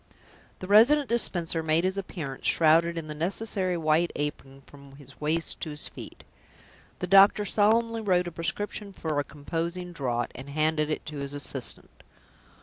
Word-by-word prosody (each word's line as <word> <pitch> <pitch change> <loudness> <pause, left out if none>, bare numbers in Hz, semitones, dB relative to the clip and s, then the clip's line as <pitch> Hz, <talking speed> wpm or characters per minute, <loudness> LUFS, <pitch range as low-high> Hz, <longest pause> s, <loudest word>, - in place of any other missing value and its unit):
The 185 - -8
Resident 250 +8 +5
Dispenser 175 -8 0
made 160 +1 +1
his 185 +1 0
appearance 165 -8 -5
shrouded 165 +1 +3
in 165 - -4
the 155 - -6
necessary 185 +2 -1
white 160 +1 +2
apron 140 -2 -5
from 140 -1 -15
his 140 0 -16
waist 160 +2 -1
to 160 - -4
his 150 0 -3
feet. - - -11 0.7
The - - -3
doctor 195 +2 +6
solemnly 225 +2 +2
wrote 180 -4 +1
a - - -5
prescription 200 +5 -3
for 155 -5 -2
a - - 0
composing 170 +5 -5
draught, 120 -7 -2
and 135 +2 -10
handed 155 +1 0
it 155 - -3
to 150 -1 -7
his 140 0 -5
assistant. 140 -3 -1
165 Hz, 160 wpm, -27 LUFS, 150-190 Hz, 0.7 s, doctor